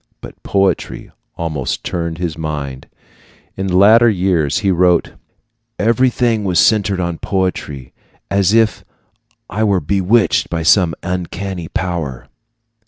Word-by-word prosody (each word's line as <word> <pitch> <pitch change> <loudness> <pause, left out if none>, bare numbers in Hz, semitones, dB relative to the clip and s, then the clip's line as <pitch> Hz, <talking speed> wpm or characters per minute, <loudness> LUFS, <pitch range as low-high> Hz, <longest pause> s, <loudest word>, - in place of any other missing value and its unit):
But - - -12
poetry 95 -2 -1 0.3
almost 80 -6 -3
turned 85 -1 -3
his 85 -2 -3
mind. 75 -4 -5 0.7
In 95 0 -3
later 110 +6 +6
years 90 -7 +1
he 95 - +3
wrote: 90 -1 +2 0.6
Everything 115 0 +1
was 90 -3 0
centered 100 -3 +2
on 85 -2 -3
poetry, 75 -9 -3 0.4
as 100 -1 +2
if 110 0 +2 0.6
I 110 +2 -2
were 100 -3 +2
bewitched 100 +4 +1
by 85 -1 -2
some 85 0 +3
uncanny 90 -1 -4
power. 85 -9 -4
90 Hz, 115 wpm, -17 LUFS, 80-100 Hz, 0.7 s, later